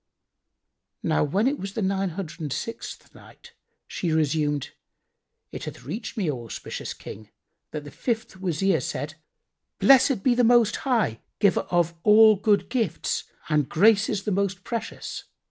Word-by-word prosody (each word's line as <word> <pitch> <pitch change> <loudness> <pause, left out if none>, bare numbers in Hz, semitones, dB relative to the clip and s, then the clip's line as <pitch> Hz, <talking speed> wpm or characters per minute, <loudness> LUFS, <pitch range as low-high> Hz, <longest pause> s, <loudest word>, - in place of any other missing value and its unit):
When 170 - +1
it 275 +2 +1
was 195 0 -5
the 220 - -2
Nine 195 0 0
Hundred 175 -3 -6
and 150 -3 -4
Sixth 230 - -6
Night, - - -16 0.3
She 175 - -3
resumed, 150 -2 0 0.8
It - - -6
hath - - -8
reached 200 - -6
me, 195 -5 0
O 125 -4 -6
auspicious 115 - -6
King, 105 0 -10 0.4
that 150 -1 -6
the 145 - -10
fifth 225 -5 -3
Wazir 190 +1 +1
said, - - -4 0.6
"Blessed 270 -5 +5
be 255 - +4
the 245 +1 +2
Most 235 -1 +4
High, 225 - 0 0.2
Giver 200 -3 +2
of 175 -1 +2
all 215 +2 +7
good 205 +1 +2
gifts 225 -9 -1 0.2
and 150 -3 +1
graces 210 +2 +3
the 210 - -2
most 195 -1 -1
precious! 230 -2 -5
195 Hz, 145 wpm, -25 LUFS, 155-225 Hz, 0.8 s, all